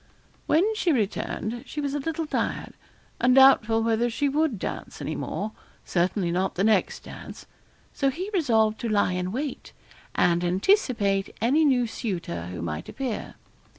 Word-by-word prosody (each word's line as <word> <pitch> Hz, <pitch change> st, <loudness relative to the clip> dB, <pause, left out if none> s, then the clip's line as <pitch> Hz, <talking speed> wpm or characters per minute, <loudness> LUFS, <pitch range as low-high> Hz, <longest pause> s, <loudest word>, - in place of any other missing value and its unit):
When 315 Hz, +4 st, +4 dB
she 380 Hz, -5 st, +1 dB
returned, 230 Hz, -1 st, -2 dB
she 300 Hz, -, -5 dB
was 285 Hz, -1 st, -2 dB
a 290 Hz, -, -1 dB
little 325 Hz, +3 st, -2 dB
tired, -, -, -2 dB, 0.5 s
and 250 Hz, +1 st, +4 dB
doubtful 230 Hz, -4 st, +6 dB
whether 230 Hz, +1 st, +1 dB
she 285 Hz, +5 st, 0 dB
would 290 Hz, -3 st, +1 dB
dance -, -, -6 dB
any -, -, -3 dB
more 215 Hz, +1 st, -3 dB, 0.3 s
certainly 180 Hz, 0 st, 0 dB
not 185 Hz, +2 st, -1 dB
the 190 Hz, -, 0 dB
next 215 Hz, -2 st, +2 dB
dance. -, -, -10 dB, 0.5 s
So 275 Hz, -, +1 dB
he 365 Hz, +9 st, -5 dB
resolved 220 Hz, -, +2 dB
to 235 Hz, -, -3 dB
lie 205 Hz, -3 st, +2 dB
in 180 Hz, 0 st, -2 dB
wait, 270 Hz, +4 st, -5 dB, 0.4 s
and 175 Hz, 0 st, +3 dB
anticipate 200 Hz, -, +1 dB
any 270 Hz, +8 st, +3 dB
new 260 Hz, -5 st, +3 dB
suitor 170 Hz, -, -4 dB
who 90 Hz, -2 st, -6 dB
might 75 Hz, -1 st, -4 dB
appear. 260 Hz, -5 st, -4 dB
225 Hz, 155 wpm, -26 LUFS, 195-275 Hz, 0.5 s, doubtful